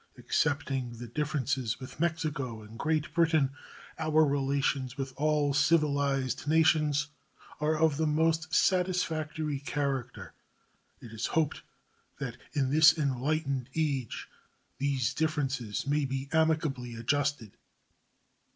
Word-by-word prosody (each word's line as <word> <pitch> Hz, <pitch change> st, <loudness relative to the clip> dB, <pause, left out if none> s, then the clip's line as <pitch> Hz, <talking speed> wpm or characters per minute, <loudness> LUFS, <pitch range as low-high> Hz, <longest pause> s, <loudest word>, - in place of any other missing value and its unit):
Excepting 140 Hz, -5 st, -1 dB
the 120 Hz, -, -7 dB
differences 130 Hz, -3 st, -1 dB
with 130 Hz, +2 st, -10 dB
Mexico 155 Hz, -9 st, -2 dB
and 110 Hz, +2 st, -12 dB
Great 155 Hz, -1 st, 0 dB
Britain, 160 Hz, -5 st, +3 dB, 0.5 s
our 155 Hz, 0 st, +4 dB
relations 140 Hz, -2 st, 0 dB
with 135 Hz, -1 st, -4 dB
all 150 Hz, -1 st, +1 dB
civilized 140 Hz, -4 st, +1 dB
nations 150 Hz, -2 st, +3 dB, 0.5 s
are 155 Hz, +1 st, +1 dB
of 155 Hz, -2 st, +2 dB
the 160 Hz, 0 st, +1 dB
most 160 Hz, +1 st, +1 dB
satisfactory 160 Hz, -5 st, +1 dB
character. 135 Hz, -3 st, -3 dB, 0.7 s
It 115 Hz, -2 st, -11 dB
is 110 Hz, -, -2 dB
hoped 160 Hz, -3 st, 0 dB, 0.6 s
that -, -, -5 dB, 0.2 s
in 135 Hz, -2 st, 0 dB
this 160 Hz, +2 st, +7 dB
enlightened 140 Hz, -1 st, -1 dB
age 140 Hz, -7 st, -1 dB, 0.5 s
these 135 Hz, -4 st, 0 dB
differences 140 Hz, -9 st, -1 dB
may 145 Hz, +1 st, +1 dB
be 135 Hz, +1 st, -4 dB
amicably 155 Hz, -7 st, +1 dB
adjusted. 135 Hz, -1 st, -1 dB
145 Hz, 110 wpm, -30 LUFS, 135-155 Hz, 0.7 s, this